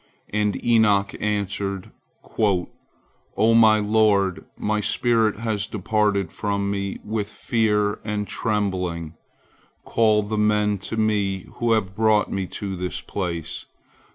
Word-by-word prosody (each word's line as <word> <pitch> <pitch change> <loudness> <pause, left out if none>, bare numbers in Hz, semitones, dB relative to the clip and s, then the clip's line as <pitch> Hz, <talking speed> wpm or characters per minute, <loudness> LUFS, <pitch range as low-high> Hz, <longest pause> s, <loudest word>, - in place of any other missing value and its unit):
And 105 -2 0
Enoch 105 -4 +3
answered: 100 -2 -2 0.4
"O 105 +2 -1
my 110 -1 +6
lord, 105 -3 +2
my 105 0 0
spirit 110 0 +1
has 110 -2 -1
departed 105 -1 0
from 100 -1 -1
me 100 -1 -3
with 105 -1 -2
fear 105 -2 0
and 105 -1 -3
trembling. 90 -7 -2 0.7
Call 110 -2 +3
the 105 +1 -2
men 105 -1 +2
to 110 - -3
me 100 -3 0
who 120 -1 +2
have 95 -4 -1
brought 110 -1 +2
me 95 -1 -2
to 95 0 -5
the 90 0 -3 0.2
place! 85 -5 -4
105 Hz, 120 wpm, -23 LUFS, 100-110 Hz, 0.7 s, my